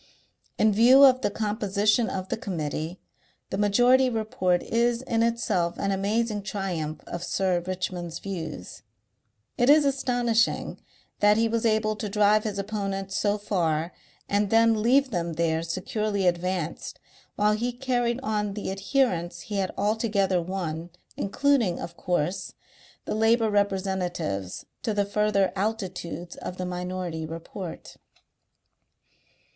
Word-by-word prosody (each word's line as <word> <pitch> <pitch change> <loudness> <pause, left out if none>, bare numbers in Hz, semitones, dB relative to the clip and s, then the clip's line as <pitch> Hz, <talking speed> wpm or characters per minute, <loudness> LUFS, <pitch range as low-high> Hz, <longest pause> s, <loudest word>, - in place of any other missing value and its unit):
In 215 -1 +4
view 250 +6 +7
of 255 -1 +5
the - - +1
composition 210 +1 +1
of 185 -1 -4
the - - 0
Committee, 165 - -4 0.5
the 190 - -1
Majority 245 +5 +4
Report 215 -6 0
is 235 +1 +1
in 230 -3 0
itself 230 -7 0
an 200 - -1
amazing 210 +2 0
triumph 185 -6 -4
of 175 0 -6
Sir 185 -1 +1
Richmond's 180 -2 -4
views; 160 - -6 0.8
it 245 +2 +4
is 295 0 +7
astonishing 245 -4 +1 0.4
that 210 0 +5
he 230 0 +3
was 230 0 0
able 215 -1 +1
to 210 0 -4
drive 210 +1 +3
his 210 -2 -3
opponents 195 -1 -3
so 205 0 +1
far 170 -5 -1 0.3
and 205 0 +1
then 225 0 +4
leave 260 +4 +3
them 170 -4 -2
there 160 0 0
securely 195 +4 -2
advanced 175 -1 -1 0.4
while 210 0 +3
he 235 +3 -1
carried 245 -1 -1
on 210 -3 -1
the 205 -2 -3
adherents 190 -5 0
he 205 - -5
had 190 -1 0
altogether 205 -3 +1
won, 170 -2 -4 0.3
including, 230 -3 +1
of 170 - -7
course, 175 0 -2 0.5
the - - -2
labour 225 0 +3
representatives, 190 - -1 0.2
to 220 - -2
the 205 -1 +2
further 200 -2 +1
altitudes 190 -4 -4
of 185 - -6
the 185 - -3
Minority 180 -2 -4
Report. 165 +3 -8
200 Hz, 130 wpm, -26 LUFS, 180-225 Hz, 0.8 s, view